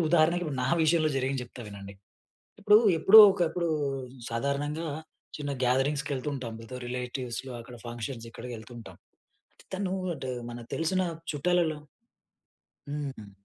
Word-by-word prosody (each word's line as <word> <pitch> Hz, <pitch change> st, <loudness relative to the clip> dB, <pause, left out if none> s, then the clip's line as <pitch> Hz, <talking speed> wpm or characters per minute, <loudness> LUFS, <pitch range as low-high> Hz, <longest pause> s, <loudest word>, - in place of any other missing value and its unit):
ఉదాహరణకి, 170 Hz, +2 st, +4 dB
ఇప్పుడు 145 Hz, -5 st, -3 dB
నా -, -, 0 dB
విషయంలో 155 Hz, -1 st, +3 dB
జరిగింది 135 Hz, 0 st, 0 dB
జెప్తా 120 Hz, 0 st, -11 dB
వినండి. 100 Hz, -1 st, -9 dB, 0.7 s
ఇప్పుడు 210 Hz, +1 st, +7 dB, 0.2 s
ఎప్పుడో 200 Hz, +7 st, +9 dB
ఒకప్పుడు, 175 Hz, -2 st, 0 dB, 0.6 s
సాధారణంగా 140 Hz, +6 st, -2 dB, 0.5 s
చిన్న 145 Hz, -1 st, -3 dB
గ్యాదరింగ్స్ 135 Hz, +3 st, +1 dB
కెళ్తుంటాం. 130 Hz, -3 st, -3 dB
ఏదో 125 Hz, +2 st, -7 dB
రిలేటివ్స్‌లో, 125 Hz, 0 st, -4 dB
అక్కడ 120 Hz, +1 st, -11 dB
ఫంక్షన్స్ 120 Hz, 0 st, -5 dB
ఇక్కడికెళ్తుంటాం. 120 Hz, -1 st, -9 dB, 0.8 s
తను 190 Hz, -1 st, -2 dB, 0.2 s
అంటే, 130 Hz, -3 st, -5 dB, 0.2 s
మనకు 120 Hz, 0 st, -9 dB
తెలిసిన 175 Hz, +3 st, +1 dB, 0.3 s
చుట్టాలలో 160 Hz, +1 st, +1 dB, 1.1 s
హ్మ్. 140 Hz, -8 st, -5 dB
135 Hz, 110 wpm, -29 LUFS, 120-160 Hz, 1.1 s, ఎప్పుడో